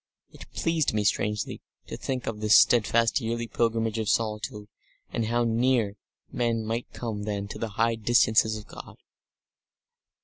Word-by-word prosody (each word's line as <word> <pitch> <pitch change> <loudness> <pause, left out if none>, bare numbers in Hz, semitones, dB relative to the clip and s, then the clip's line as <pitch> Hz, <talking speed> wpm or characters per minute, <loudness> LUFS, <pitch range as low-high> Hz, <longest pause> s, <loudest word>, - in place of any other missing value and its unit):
It - - -14
pleased 160 -8 0
me 105 - +1
strangely 105 0 -1 0.2
to - - -7
think 130 -2 -4
of 110 -2 -4
this 105 0 +6
steadfast 115 +2 +3
yearly 115 +1 -2
pilgrimage 115 -1 0
of 110 - -1
solitude, 105 -1 -2 0.4
and 115 -2 -1
how 120 +1 +1
near 115 -2 +1 0.4
men 115 -2 -1
might 115 +2 -3
come 110 -4 -5
then 100 -1 -3
to - - -7
the 115 - -3
high 115 +1 +3
distances 110 -1 +3
of 105 - -10
God. - - -12
115 Hz, 150 wpm, -26 LUFS, 105-120 Hz, 0.4 s, this